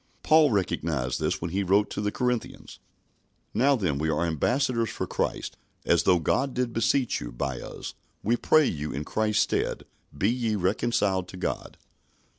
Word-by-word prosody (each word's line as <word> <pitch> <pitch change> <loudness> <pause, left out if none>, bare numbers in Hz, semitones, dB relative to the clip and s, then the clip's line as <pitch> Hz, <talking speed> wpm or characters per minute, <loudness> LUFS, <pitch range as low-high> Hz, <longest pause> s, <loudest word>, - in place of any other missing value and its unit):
Paul 155 -1 +5
recognised 80 - -1
this - - -1
when 85 - -3
he 95 +3 0
wrote 100 +2 +2
to - - -3
the 105 0 -1
Corinthians, 125 -1 -3 0.7
"Now 140 +3 +4
then 85 - -1
we 80 +1 0
are 80 +2 +1
ambassadors 115 - 0
for - - -3
Christ, - - -3 0.3
as 85 -3 +4
though 90 - +6
God 130 - 0
did 125 -2 -1
beseech 115 +3 +1
you - - -6
by 65 +1 -3
us: - - -7 0.3
we 115 +3 +2
pray 155 +5 +4
you 75 - -2
in 70 +2 -3
Christ's 105 +2 +1
stead, - - -2 0.3
be 95 - +2
ye 120 -3 -1
reconciled 95 -1 0
to 95 - -10
God." - - -4
105 Hz, 170 wpm, -27 LUFS, 85-120 Hz, 0.7 s, though